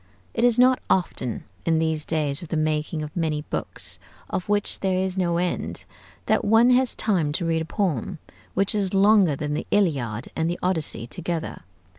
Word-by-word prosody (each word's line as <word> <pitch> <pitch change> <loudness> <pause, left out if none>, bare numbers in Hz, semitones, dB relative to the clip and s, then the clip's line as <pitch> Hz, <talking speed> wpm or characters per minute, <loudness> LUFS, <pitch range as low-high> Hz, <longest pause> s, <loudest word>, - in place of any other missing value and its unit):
It - - -1
is 245 -1 +4
not 255 +1 +5
often, 130 -9 0 0.2
in 165 -1 +2
these 160 -1 0
days 150 -3 +1
of 170 - -8
the 160 - -2
making 155 0 -1
of 150 - -8
many 155 -3 -1
books - - -3 0.3
of 185 - -3
which 205 -1 0
there 190 -1 0
is 190 0 -1
no 175 -3 +1
end, 180 0 -2 0.4
that - - +2
one 225 +4 +5
has 255 0 +3
time 175 -9 +1
to 170 - -1
read 165 -1 +1
a - - -3
poem 170 - -2 0.4
which 195 +1 +2
is 200 -2 0
longer 195 -5 +5
than 150 +1 -3
the 150 - -3
'Iliad' 135 - 0
and 160 +1 0
the 175 - -2
'Odyssey' 165 -9 +1
together. 165 +6 -4
170 Hz, 185 wpm, -24 LUFS, 155-195 Hz, 0.4 s, not